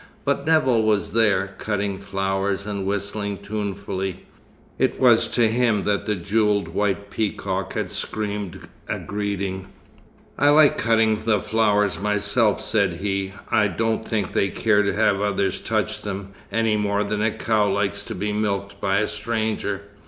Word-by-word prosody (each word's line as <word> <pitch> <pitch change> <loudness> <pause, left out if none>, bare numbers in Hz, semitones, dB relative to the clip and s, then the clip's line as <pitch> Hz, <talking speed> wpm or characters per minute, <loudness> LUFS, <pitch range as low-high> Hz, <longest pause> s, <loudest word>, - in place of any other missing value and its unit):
But - - 0
Nevill 130 -8 +4
was 110 -2 +1
there, 100 -4 +2
cutting 100 -2 -2
flowers 95 0 -1
and 100 -2 -3
whistling 100 0 -2
tunefully. 100 -2 -4 0.5
It - - +1
was - - +5
to 120 -2 +2
him 115 -2 +1
that 105 +1 0
the 105 - +1
jewelled 100 0 +1
white 100 +3 -1
peacock 100 -3 -2
had - - -3
screamed 105 -4 -4 0.2
a - - -1
greeting. 100 -2 -3 0.7
"I 145 - +5
like 150 0 +5
cutting 110 -1 +3
the 110 -2 +1
flowers 105 -2 +1
myself," 105 +2 +2
said 100 -5 +2
he. 95 +1 -3 0.2
"I 105 -1 +4
don't 110 +4 -1
think 105 -5 -1
they 100 - +2
care 105 +2 +2
to 100 - 0
have 100 -2 +2
others 100 -2 0
touch - - -1
them, 100 -1 -5 0.2
any 115 -1 +2
more 100 0 0
than 105 0 -2
a 110 - +3
cow 105 -1 +1
likes 100 -1 0
to - - -6
be 105 +1 -2
milked 100 -1 -2
by 100 +1 +2
a 105 - 0
stranger. 105 -2 -2
105 Hz, 155 wpm, -23 LUFS, 100-110 Hz, 0.7 s, was